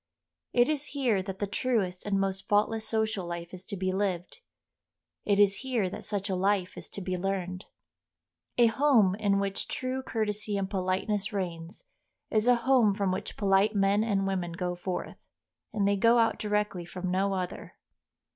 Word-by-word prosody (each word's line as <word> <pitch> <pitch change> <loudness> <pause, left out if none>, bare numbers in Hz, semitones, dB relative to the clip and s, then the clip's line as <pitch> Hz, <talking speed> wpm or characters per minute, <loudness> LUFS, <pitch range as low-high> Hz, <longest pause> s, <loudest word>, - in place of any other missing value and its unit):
It 245 0 +4
is 300 -2 -1
here 235 -8 +2
that 190 0 -6
the 205 - -1
truest 200 -4 -1
and 195 -1 +1
most 195 0 -2
faultless 215 +2 +2
social 220 -4 -1
life 170 +1 -6
is 185 0 -7
to 200 - -5
be 185 0 0
lived; 190 - -2 0.9
it 200 -1 +3
is 200 -1 +5
here 240 -8 -1
that - - -7
such 200 -2 -2
a 195 - -1
life 190 0 +1
is - - -7
to 200 - -7
be 185 -1 -2
learned. 185 0 -3 0.9
A 240 - +6
home 230 -5 +4
in 200 -1 +1
which 195 0 -2
true 255 +1 -3
courtesy 210 -4 -2
and 195 -1 -1
politeness 195 +2 -1
reigns 175 - -5 0.5
is 215 +1 +2
a 245 - +7
home 245 -7 +4
from 200 -2 0
which 185 - -4
polite 200 +1 +3
men 200 +1 +3
and 200 -3 +1
women 185 -3 -2
go 180 0 -2
forth, 175 +1 -5 0.5
and 205 -2 +1
they 200 0 +2
go 230 +4 +5
out 225 -1 +2
directly 210 -3 -1
from 180 +1 -5
no 195 +2 +1
other. 180 -1 -5
200 Hz, 175 wpm, -29 LUFS, 185-215 Hz, 0.9 s, a